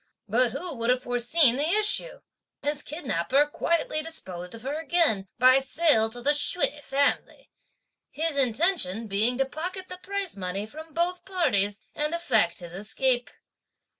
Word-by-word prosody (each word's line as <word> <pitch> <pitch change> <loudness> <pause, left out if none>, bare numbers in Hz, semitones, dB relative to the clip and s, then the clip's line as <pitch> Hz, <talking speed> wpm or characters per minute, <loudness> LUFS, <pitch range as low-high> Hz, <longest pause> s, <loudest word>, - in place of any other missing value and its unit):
But 240 +4 +2
who 345 +8 -6
would 230 +1 -2
have 250 0 +2
foreseen 245 +2 +2
the 295 +3 +1
issue? 430 +4 +2 0.4
This 295 0 0
kidnapper 275 - 0
quietly 310 +1 -1
disposed 185 - -4
of 225 - -11
her 275 +2 -3
again 320 - +1
by 255 +2 +6
sale 270 -5 +3
to 240 +1 -7
the 290 - +5
Hsüeh 295 0 0
family; 280 +1 -1 0.6
his 320 -1 -1
intention 255 - +1
being 220 +4 0
to 270 - +2
pocket 360 +8 -6
the 365 - -7
price 395 -1 -3
money 195 +1 -4
from 315 +7 -11
both 350 +1 -1
parties, 220 - 0
and 300 +3 -1
effect 235 - +1
his 175 -1 -8
escape. 245 +6 0
270 Hz, 150 wpm, -26 LUFS, 225-330 Hz, 0.6 s, by